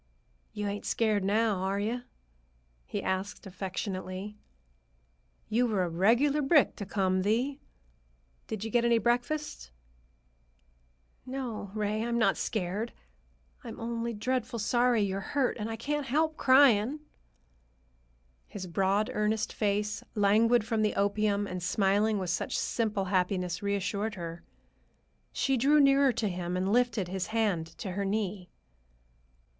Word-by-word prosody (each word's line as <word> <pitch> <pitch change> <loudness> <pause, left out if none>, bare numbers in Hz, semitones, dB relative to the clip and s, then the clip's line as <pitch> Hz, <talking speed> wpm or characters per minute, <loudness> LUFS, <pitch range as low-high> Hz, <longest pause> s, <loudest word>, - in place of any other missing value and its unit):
"You 210 -1 -4
ain't 205 0 -4
scared 215 -3 +1
now, 210 +1 +2
are 190 +2 -1
you?" 230 +4 -2 0.9
he - - -4
asked 190 +3 -3
affectionately. 190 +1 -5 1.1
"You 235 +3 +2
were 205 -5 +1
a 175 - -1
regular 240 - +3
brick 285 +1 +4
to 200 - -6
come, 185 -2 +1
Thee. 245 +8 0 0.9
Did 215 -2 -4
you 225 - -4
get 240 +1 +3
any 235 -1 +4
breakfast?" 245 - -1 1.5
"No, 250 -6 -5
Ray, 215 +1 -1
I'm 235 0 -1
not 230 - +3
scared. 210 +3 -3 0.7
Only 235 0 -4
I'm - - -8
dreadful 250 +1 -1
sorry 240 +1 +2
you're 195 -1 -1
hurt, 260 +6 0
and 215 +1 -3
I 225 - -3
can't 290 +4 -3
help 310 +4 +1
crying." 260 0 +4 1.5
His 190 -2 -7
broad, 195 +4 +1
earnest 210 0 0
face, 210 0 -1
languid 215 +3 +4
from 225 -1 0
the 215 - +1
opium 205 0 +1
and 185 -2 -5
smiling 200 +4 +2
with 185 -3 -2
such 180 - -1
simple 210 -4 -1
happiness, 180 -1 0
reassured 200 +2 -1
her. 170 -2 -6 0.9
She 270 -1 +1
drew 285 +5 +4
nearer 275 -1 +5
to 220 - -1
him 180 -1 -3
and 190 +2 0
lifted 240 -6 +2
his 185 0 -3
hand 210 -7 0
to 190 - -5
her 200 +2 -2
knee. 195 -2 -2
210 Hz, 135 wpm, -29 LUFS, 195-235 Hz, 1.5 s, nearer